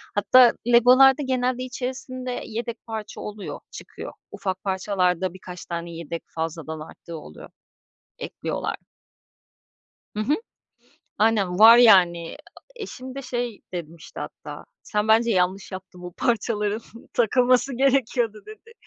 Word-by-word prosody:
Hatta 240 +4 +6
Lego'larda 255 +4 +6
genelde 255 -1 -1
içerisinde 255 0 -5
yedek 230 +1 -6
parça 220 -2 -6
oluyor, 210 -1 -7
çıkıyor. - - -9 0.2
Ufak 190 -2 -4
parçalarda 185 -2 0
birkaç 180 -1 -10
tane 170 0 -5
yedek 165 0 -6
fazladan 160 -1 -4
arttığı 165 +2 -10
oluyor. 75 - -12 0.7
Ekliyorlar. - - -4 1.4
Hı 210 - -5
hı. 285 +7 +2 0.8
Aynen, 205 -5 +2
var 225 +2 +10
yani, 175 -7 +5 0.4
eşim 260 - -8
de 275 - -6
şey 240 -4 -4
demişti 170 -2 -8
hatta, - - -8 0.2
"Sen 210 0 -2
bence 225 +2 +4
yanlış 185 0 0
yaptın 185 -1 -9
bu 180 -1 -8
parçaların, 215 -1 -1 0.3
takılması 250 +3 +2
gerekiyordu." 245 -4 +1
dedi. 435 +2 -13
215 Hz, 115 wpm, -24 LUFS, 180-250 Hz, 1.4 s, var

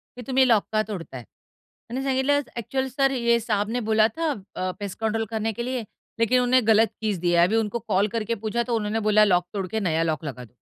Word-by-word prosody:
की 250 - -8
तुम्ही 260 0 +3
लॉक 220 -4 +4
का 215 - +3
तोडत 185 -9 -7
आहे? 125 -2 -7
त्यांनी 255 - -11
सांगितलं, 265 +1 +2 0.2
"अ‍ॅक्चुअली 265 +3 -2
सर 270 +1 +1
ये 235 -2 +2
साहब 210 -2 -1
ने 245 +2 -1
बोला 220 0 +5
था 325 -2 0 0.2
अ, 185 0 -2
पेस्ट 200 0 -6
कंट्रोल 225 0 -1
करने 220 0 -2
के 235 - -4
लिए, 255 -2 -2 0.4
लेकिन 230 +2 +3
उन्होंने 250 +1 +3
गलत 220 0 +5
कीज 210 -4 -1
दिया 175 0 +3
है, 175 - +5
अभी 220 - 0
उनको 225 +1 0
कॉल 200 0 +2
करके 230 +1 -1
पूछा, 235 +2 0
तो 235 -1 -1
उन्होंने 215 0 -1
बोला 215 0 +6
लॉक 180 -3 +2
तोडके 200 +2 -2
नया 165 -4 0
लॉक 160 -1 -2
लगा 125 -3 -6
दो." 120 - -24
220 Hz, 230 wpm, -24 LUFS, 200-245 Hz, 0.4 s, बोला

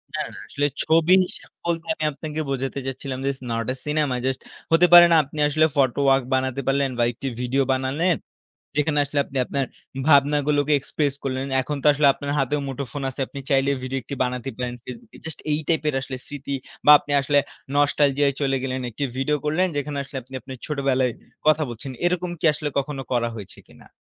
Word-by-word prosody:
না, - - -2
না। - - -10
আসলে 145 0 0 0.2
ছবি 165 +2 +4
হিসেব - - -13 0.2
বলতে 170 -1 -1
আমি 155 - -6
আপনাকে 150 +2 -6
বোঝাতে 135 0 -2
চাচ্ছিলাম, 135 0 -5
it's 135 -1 -1
not 115 0 -1
a - - -8
cinema, 150 -3 0
just 130 -1 -1 0.3
হতে 170 +2 +6
পারে 175 0 +11
না? - - +6
আপনি 145 +2 -9
আসলে 155 +2 +3
ফটো 135 -1 +2
ওয়ার্ক 135 -1 +4
বানাতে 130 0 -1
পারলেন 135 0 +2
বা - - +4
একটি 130 +3 -6
ভিডিও 130 +2 +1
বানালেন। 140 +7 +1 0.6
যেখানে 150 0 +1
আসলে 145 +1 -3
আপনি 135 - -11
আপনার 135 +2 -1 0.4
ভাবনাগুলোকে 145 0 +3
এক্সপ্রেস 140 +1 -2
করলেন। 130 0 -2
এখন 145 +3 -3
তো - - 0
আসলে 145 0 +2
আপনার 140 0 -5
হাতেও 145 +2 0
মুঠোফোন 135 0 -5
আছে। 130 - -9
আপনি 140 - -9
চাইলে 135 0 +3
ভিডিও 130 +1 -2
একটি 130 - -6
বানাতে 125 0 -2
পারেন, 125 -1 -3
Facebook 125 -2 -10
এ। - - -14
জাস্ট 160 - -6
এই 150 - +2
টাইপের 155 -3 +1
আসলে 130 0 -6
স্মৃতি 140 -1 -5 0.3
বা - - +9
আপনি 145 - -7
আসলে 145 +1 +2 0.4
নস্টালজিয়া 145 0 +3
-য় - - -8
চলে 135 -1 +1
গেলেন. 130 0 -2
একটি 120 - -8
ভিডিও 135 +3 +1
করলেন 155 +5 +2
যেখানে, 145 0 -2
আসলে 140 0 -10
আপনি 130 +3 -15
আপনার 130 +2 -9
ছোটবেলায় 135 -4 +1 0.3
কথা 155 0 +5
বলছেন। 120 +4 -7 0.2
এরকম 180 0 0
কি - - -10
আসলে 150 0 -3
কখনো 140 -1 -3
করা 120 -1 +1
হয়েছে 105 -4 -10
কিনা? - - -18
140 Hz, 195 wpm, -23 LUFS, 130-150 Hz, 0.6 s, পারে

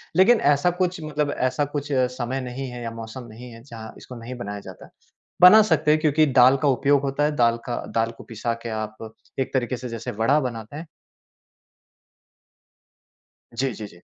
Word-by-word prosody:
लेकिन 215 +5 +5
ऐसा 145 +5 +1
कुछ 180 -2 -1
मतलब 150 -1 -2
ऐसा 130 +3 0
कुछ 145 0 -3
समय 130 0 -1
नहीं 130 +2 -5
है 125 0 -8
या 115 - -4
मौसम 115 +2 -8
नहीं 120 +3 -11
है, 115 0 -13
जहाँ 115 -4 -10
इसको 125 - -11
नहीं 120 +2 -7
बनाया 105 -4 -6
जाता। - - -12 0.5
बना 210 +5 +9
सकते 155 -5 +2
हैं 155 - +3
क्योंकि 155 0 +3
दाल 130 0 +5
का 145 - +2
उपयोग 140 +1 +3
होता 140 +1 -1
है 150 0 +1
दाल 115 -3 +3
का 120 - -3 0.2
दाल 115 0 +1
को - - -11
पिसा 115 +1 -3
के 120 - -5
आप 110 0 -6 0.3
एक 135 - -2
तरीके 125 -1 -1
से 125 0 -7
जैसे 115 -1 -5
वड़ा 115 +8 +2
बनाते 115 0 -6
हैं। 160 +2 -8 2.7
जी, 130 -1 -1
जी, 105 -1 -7
जी। 85 - -18
125 Hz, 185 wpm, -23 LUFS, 115-145 Hz, 2.7 s, बना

